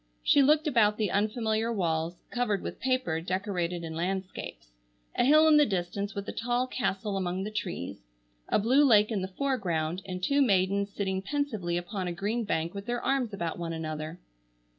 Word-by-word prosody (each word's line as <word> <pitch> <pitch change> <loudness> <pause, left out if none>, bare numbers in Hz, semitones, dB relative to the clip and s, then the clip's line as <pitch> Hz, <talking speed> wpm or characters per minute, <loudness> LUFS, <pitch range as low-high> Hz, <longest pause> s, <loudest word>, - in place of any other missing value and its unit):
She 285 - +5
looked 300 +3 +4
about 220 -8 +3
the 210 -4 0
unfamiliar 220 +2 0
walls, 165 -4 -1 0.2
covered 240 -5 0
with - - -6
paper 255 -11 0
decorated 180 -2 -2
in 160 -1 -5
landscapes—a - - -5
hill 305 +4 +6
in 310 -1 +7
the 295 - +7
distance 200 +2 -2
with 200 0 -4
a - - -2
tall 245 +2 0
castle 210 -5 -2
among 185 0 -2
the 210 - -4
trees, 175 - -4 0.5
a - - +3
blue 255 +7 +4
lake 215 -5 +5
in 205 -4 0
the 185 - -2
foreground 185 - -1
and 180 -1 -5
two 280 +7 +3
maidens 200 -3 +2
sitting 190 -2 -2
pensively 215 -8 -2
upon 180 +2 -4
a 175 - -2
green 215 +6 -2
bank 165 -3 -1
with 200 0 -7
their 240 0 -1
arms 265 -4 0
about 175 -4 -3
one 165 -1 -3
another. 155 0 -5
200 Hz, 180 wpm, -29 LUFS, 175-235 Hz, 0.5 s, in